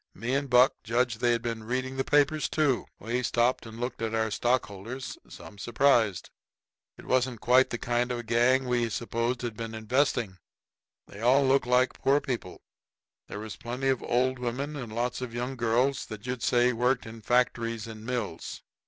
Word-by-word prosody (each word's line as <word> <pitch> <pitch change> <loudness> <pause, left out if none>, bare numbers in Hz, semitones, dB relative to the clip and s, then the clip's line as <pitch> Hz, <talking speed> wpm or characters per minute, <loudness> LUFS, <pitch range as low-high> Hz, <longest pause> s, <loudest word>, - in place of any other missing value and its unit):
Me 115 +6 -3
and 140 0 0
Buck 125 +3 +6
judged 120 -1 0
they'd 120 -1 +2
been 115 -2 -3
reading 130 +3 -2
the 135 - 0
papers, 145 +2 +2
too. 145 -5 +1
We 120 +4 -2
stopped 120 0 +1
and 110 +1 -10
looked 120 -1 -4
at 115 0 -1
our 110 -1 0
stockholders, 120 +1 -2
some 100 - -12
surprised. 115 -4 +2 0.7
It - - -13
wasn't 130 -2 +1
quite 125 +4 +4
the 120 - -3
kind 120 +1 0
of 125 - -1
a 120 - -5
gang 120 +3 +3
we 120 -2 +1
supposed 115 +2 -2
had 120 -3 -3
been 115 0 -6
investing. 110 -4 0 0.7
They 100 - -12
all 130 +4 +4
looked 135 -1 +3
like 125 +1 +3
poor 140 +2 +4
people; 120 -10 -5 0.7
there - - -7
was 110 0 -7
plenty 125 +3 -2
of 130 -2 +1
old 130 +1 +1
women 130 +5 -3
and 125 -6 -6
lots 120 +3 -2
of 120 -2 -5
young 125 +2 -3
girls 120 +3 +1
that 110 -1 -8
you'd 125 -1 -3
say 125 +1 +3
worked 125 +2 +1
in 115 0 -9
factories 115 -1 +1
and 110 -1 -9
mills. 115 -8 -4
120 Hz, 180 wpm, -28 LUFS, 115-130 Hz, 0.7 s, Buck